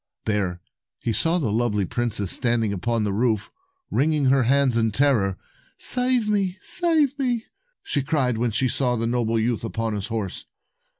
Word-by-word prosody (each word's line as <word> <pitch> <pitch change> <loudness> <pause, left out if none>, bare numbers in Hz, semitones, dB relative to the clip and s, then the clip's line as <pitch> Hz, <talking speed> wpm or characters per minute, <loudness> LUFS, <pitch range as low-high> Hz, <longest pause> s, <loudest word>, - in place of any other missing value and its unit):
There 95 -5 -1 0.4
he 115 - 0
saw 165 +9 +2
the 135 -11 -1
lovely 105 -3 0
princess 110 -3 -1
standing 115 -3 +3
upon 115 +3 -1
the 105 -2 -1
roof, 110 -1 0 0.4
wringing 150 0 +1
her 130 +1 +4
hands 135 -1 +3
in 115 -1 +2
terror. 105 -5 +2 0.4
"Save 250 -3 +1
me! 200 -3 0
Save 310 - +1
me!" 245 -4 -1 0.4
she 145 - -1
cried 135 -5 0
when 120 0 +1
she 120 +4 0
saw 125 0 0
the 115 0 -1
noble 115 -1 0
youth 115 0 0
upon 115 -1 -2
his 100 0 -3
horse. 110 -5 -4
120 Hz, 165 wpm, -23 LUFS, 110-145 Hz, 0.4 s, her